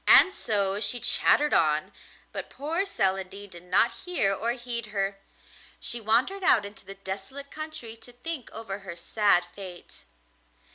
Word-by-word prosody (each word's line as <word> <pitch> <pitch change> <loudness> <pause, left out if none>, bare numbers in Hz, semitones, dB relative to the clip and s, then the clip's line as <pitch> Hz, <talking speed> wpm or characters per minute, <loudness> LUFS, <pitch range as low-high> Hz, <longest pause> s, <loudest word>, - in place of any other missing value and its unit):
And 380 - +9
so 200 - +1
she 220 +3 +3
chattered 295 +4 +3
on, 155 -1 +2 0.4
but - - -4
poor 330 +8 -2
Celandine 195 - -2
did 175 - -10
not 185 +6 +5
hear 345 - +1
or 230 +4 -1
heed 240 -2 -3
her; 195 -1 -2 0.6
she 235 0 -3
wandered 250 - +1
out 295 - +5
into 205 +2 -11
the 195 - -8
desolate 195 +9 -7
country 310 -8 -7
to 225 +2 -14
think 255 +2 -6
over 210 -3 -6
her 190 -4 -8
sad 180 +1 +3
fate. 185 -3 -10
215 Hz, 150 wpm, -27 LUFS, 195-250 Hz, 0.6 s, And